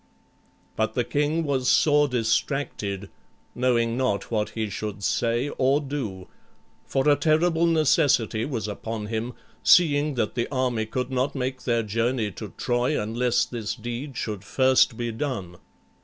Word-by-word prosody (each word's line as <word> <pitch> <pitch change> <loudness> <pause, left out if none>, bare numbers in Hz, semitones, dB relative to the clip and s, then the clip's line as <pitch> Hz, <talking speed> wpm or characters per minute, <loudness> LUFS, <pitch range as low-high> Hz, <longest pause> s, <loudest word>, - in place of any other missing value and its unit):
But - - -1
the - - +2
king 150 +3 0
was 135 -4 0
sore 145 -1 +4
distracted, 110 -5 -1 0.4
knowing 120 -2 +1
not 125 -7 -1
what 105 -2 0
he 110 -1 0
should 105 0 -5
say 120 +6 0
or 135 +2 +3
do, 130 -11 -5 0.6
for 135 +2 0
a 145 - +6
terrible 160 +3 +2
necessity 145 -8 +2
was 115 -6 -3
upon 110 +1 -5
him, 115 +3 -3 0.3
seeing 150 -4 +4
that 110 -4 -1
the 120 -1 -1
army 125 -5 0
could 125 +3 -3
not 130 +2 0
make 130 0 -3
their 115 -2 +1
journey 115 +1 -1
to - - -8
Troy 125 +4 0
unless 115 +3 +1
this 110 -3 -4
deed 120 +3 -6
should 105 -3 -4
first 130 +1 +3
be 120 -1 -2
done. 110 -9 -4
125 Hz, 145 wpm, -25 LUFS, 110-140 Hz, 0.6 s, a